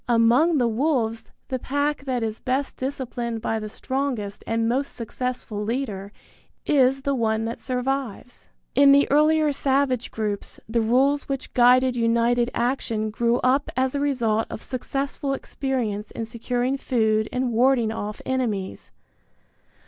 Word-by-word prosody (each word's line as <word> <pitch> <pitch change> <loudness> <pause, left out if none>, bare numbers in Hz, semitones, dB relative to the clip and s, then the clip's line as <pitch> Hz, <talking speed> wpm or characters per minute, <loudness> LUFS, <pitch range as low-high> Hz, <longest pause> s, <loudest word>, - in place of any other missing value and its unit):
Among 245 +8 +4
the 245 -3 +3
wolves 230 -2 0 0.2
the 260 - -2
pack 285 +2 -1
that 250 -3 -1
is 220 -1 -3
best 265 +2 -1
disciplined 245 -3 -4
by 220 0 -1
the 215 0 -6
strongest 250 -4 -3
and 225 0 0
most 265 +4 -1
successful 235 -2 -4
leader 210 -4 -3 0.5
is 270 -1 +3
the 280 - +1
one 225 -3 0
that 230 +1 -4
survives. 255 -2 -3 0.2
In 280 0 +7
the 280 0 +5
earlier 305 +1 +4
savage 270 -3 +1
groups 210 -2 -4
the 230 +1 +1
rules 270 +6 +2
which 275 -1 -4
guided 250 +1 +5
united 235 +1 +2
action 230 -3 -1
grew 235 +2 +1
up 265 +3 +2
as 260 0 +1
a 285 - -1
result 235 -6 +1
of - - -7
successful 275 +1 -3
experience 240 -8 -3
in 225 - -5
securing 245 +3 -2
food 220 -5 +1
and 250 -1 -1
warding 240 -1 +3
off 210 -1 -5
enemies. 225 -8 -2
245 Hz, 140 wpm, -24 LUFS, 225-270 Hz, 0.5 s, In